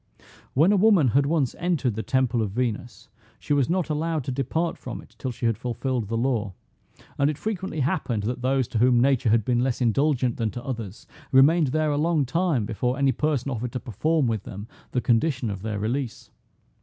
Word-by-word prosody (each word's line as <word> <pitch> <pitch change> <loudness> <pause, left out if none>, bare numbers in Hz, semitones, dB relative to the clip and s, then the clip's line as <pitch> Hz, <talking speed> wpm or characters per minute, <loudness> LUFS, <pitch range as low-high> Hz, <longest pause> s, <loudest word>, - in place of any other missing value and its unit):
When 160 +9 +5
a 205 - +4
woman 190 - +5
had 140 +4 +2
once 150 -5 +1
entered 165 -9 0
the 110 - -3
temple 125 -1 +1
of 105 - -1
Venus, 110 -1 -3 0.3
she 145 - -2
was 140 -1 +2
not 180 0 0
allowed 155 0 -1
to 130 - -3
depart 140 +6 -1
from 125 - -7
it - - -16
till 130 - -3
she 120 0 -5
had 115 -2 +1
fulfilled 125 -1 -2
the 115 +2 -2
law: 115 -5 -1 0.7
and 140 +1 +3
it 150 - -3
frequently 190 -7 -3
happened 130 - -1
that 125 +3 -3
those 130 -1 +1
to 110 - -1
whom 125 0 +4
nature 130 -2 +3
had 110 -1 +3
been 120 -1 +1
less 125 -1 0
indulgent 125 0 +1
than 115 -2 0
to 120 +3 -8
others, 115 -4 -6 0.3
remained 150 +4 +5
there 155 +3 +1
a 145 - 0
long 160 -2 +2
time 150 - 0
before 125 +4 -1
any 140 -1 +3
person 140 0 -1
offered 120 -1 -4
to 125 - -2
perform 150 - 0
with 110 -4 -1
them 100 +2 -8 0.2
the 125 - 0
condition 120 -1 +1
of 100 -2 -6
their 105 0 -3
release. 115 +3 -3
130 Hz, 205 wpm, -25 LUFS, 115-150 Hz, 0.7 s, When